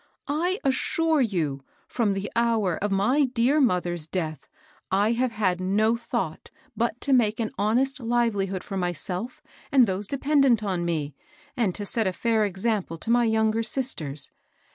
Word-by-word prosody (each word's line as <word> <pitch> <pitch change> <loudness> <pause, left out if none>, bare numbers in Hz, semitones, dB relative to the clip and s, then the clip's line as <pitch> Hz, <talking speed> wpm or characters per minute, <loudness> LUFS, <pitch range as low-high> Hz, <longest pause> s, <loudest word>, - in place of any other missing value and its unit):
I 350 +7 0
assure 315 +3 +1
you, 160 - -1 0.2
from 220 -5 0
the 195 +1 -4
hour 225 -6 +2
of 205 - +1
my 250 +10 +3
dear 255 +4 +2
mother's 175 - 0
deaths 160 -5 -4 0.4
I 200 +3 +2
have 240 0 0
had 185 -4 0
no 215 +5 +2
thought 230 -8 -4 0.3
but 235 +2 -1
to 280 - +1
make 220 -4 +3
an 220 -2 -1
honest 250 +8 +1
livelihood 225 -6 0
for 195 - -5
my 180 -1 0
self 185 - -6 0.3
and 265 -3 +6
those 195 0 -3
dependent 275 -4 +2
on 185 -4 -1
me, 155 -4 -2 0.4
and 215 -7 0
to 205 - -4
set 220 +1 +1
a 185 - 0
fiur 220 0 +1
Example 195 -3 -2
to 225 - -3
my 240 0 +4
younger 220 0 +2
sisters. 170 - -2
220 Hz, 165 wpm, -25 LUFS, 185-240 Hz, 0.4 s, and